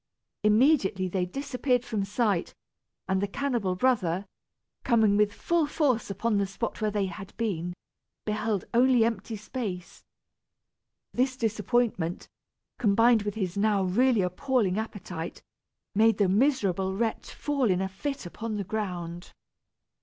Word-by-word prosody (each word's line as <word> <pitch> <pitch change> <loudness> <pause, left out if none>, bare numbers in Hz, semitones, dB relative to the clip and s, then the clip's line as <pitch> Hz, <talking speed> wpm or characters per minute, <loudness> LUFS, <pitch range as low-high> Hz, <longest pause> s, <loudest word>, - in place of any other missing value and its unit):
Immediately 210 -4 +3
they 180 0 -1
disappeared 250 +2 -1
from 215 -4 -1
sight, 205 -3 0 0.5
and 190 0 +1
the 200 - 0
cannibal 235 -5 -1
brother, 190 -6 +1 0.6
coming 220 -4 +4
with 210 0 +3
full 335 +7 0
force 275 -8 +1
upon 205 +2 0
the 200 - +1
spot 220 +4 -4
where 215 - +2
they 205 -1 0
had 190 +1 -8
been, 180 -6 -2 0.5
beheld 215 -2 -1
only 245 -1 +5
empty 230 0 -2
space. 205 -5 -6 1.1
This 255 +1 +1
disappointment, 220 -5 0 0.5
combined 225 +1 +4
with 205 -1 -3
his 185 -5 -2
now 205 -1 +2
really 225 +3 +3
appalling 210 +1 0
appetite, 185 -6 -6 0.5
made 225 +2 +4
the 205 - +3
miserable 195 -4 +2
wretch 225 0 -2
fall 280 -5 0
in 185 -1 +2
a 190 - 0
fit 235 +7 -5
upon 215 +5 -5
the 205 - -2
ground. 175 -4 -4
210 Hz, 130 wpm, -28 LUFS, 190-240 Hz, 1.1 s, only